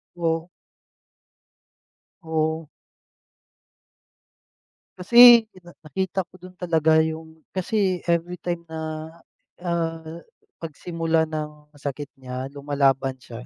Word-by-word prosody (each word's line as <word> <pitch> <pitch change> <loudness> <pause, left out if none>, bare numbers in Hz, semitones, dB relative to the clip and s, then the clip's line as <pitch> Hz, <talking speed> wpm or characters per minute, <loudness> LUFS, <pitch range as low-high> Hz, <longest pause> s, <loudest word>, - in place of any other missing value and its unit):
O 165 0 -1 1.7
Oo. 160 -1 -1 2.3
Kasi, 235 +4 +9
pina 175 -2 -15
nakita 190 +4 -2
ko - - -62
din 185 0 -12
talaga, 160 -3 +3
yung 160 0 -6
kasi 190 -1 0
everytime 170 0 -1
na, 160 0 -5 0.8
ah, 165 -2 -2 0.6
pagsimula 165 0 -1
ng 150 -1 -6
sakit 145 0 -5
niya, 130 +1 -5
lumalaban 140 -2 +1
siya, 120 0 -10
160 Hz, 85 wpm, -24 LUFS, 150-175 Hz, 2.3 s, Kasi